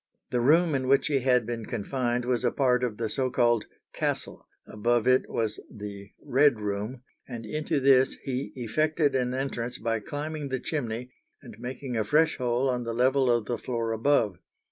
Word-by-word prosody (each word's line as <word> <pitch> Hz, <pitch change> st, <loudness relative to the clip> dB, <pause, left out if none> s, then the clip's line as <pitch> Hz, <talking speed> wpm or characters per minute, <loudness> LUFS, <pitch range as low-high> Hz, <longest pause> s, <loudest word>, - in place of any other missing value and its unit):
The 120 Hz, -, +1 dB
room 160 Hz, +5 st, +4 dB
in 130 Hz, -2 st, 0 dB
which 135 Hz, +1 st, +4 dB
he 140 Hz, -2 st, +2 dB
had 125 Hz, -2 st, +3 dB
been 115 Hz, -1 st, -4 dB
confined 120 Hz, +2 st, -1 dB
was 125 Hz, -2 st, 0 dB
a -, -, +3 dB
part 125 Hz, -2 st, +2 dB
of 115 Hz, -4 st, -2 dB
the 115 Hz, -, -1 dB
so 130 Hz, +4 st, -1 dB
called 120 Hz, -3 st, +2 dB, 0.3 s
"castle;" -, -, -3 dB, 0.2 s
above 120 Hz, +2 st, 0 dB
it 130 Hz, 0 st, +3 dB
was 110 Hz, -2 st, -2 dB
the 100 Hz, -2 st, -8 dB
"Red 135 Hz, -3 st, +3 dB
room," 105 Hz, +5 st, -4 dB, 0.2 s
and 115 Hz, -3 st, -7 dB
into 155 Hz, +4 st, -1 dB
this 135 Hz, -1 st, +4 dB
he 130 Hz, +1 st, -3 dB
effected 150 Hz, +5 st, +1 dB
an 125 Hz, -1 st, 0 dB
entrance 125 Hz, -2 st, -3 dB
by 115 Hz, 0 st, -1 dB
climbing 145 Hz, +5 st, -5 dB
the 130 Hz, -1 st, -1 dB
chimney 125 Hz, -4 st, -3 dB, 0.3 s
and 120 Hz, -5 st, -11 dB
making 125 Hz, +1 st, -5 dB
a 110 Hz, -, +1 dB
fresh 150 Hz, +7 st, +3 dB
hole 125 Hz, +1 st, +1 dB
on 125 Hz, -2 st, 0 dB
the 115 Hz, -1 st, -4 dB
level 130 Hz, +1 st, +3 dB
of 120 Hz, -3 st, +2 dB
the 120 Hz, -, -3 dB
floor 115 Hz, -2 st, -2 dB
above. 110 Hz, -5 st, +2 dB
125 Hz, 185 wpm, -27 LUFS, 115-135 Hz, 0.3 s, room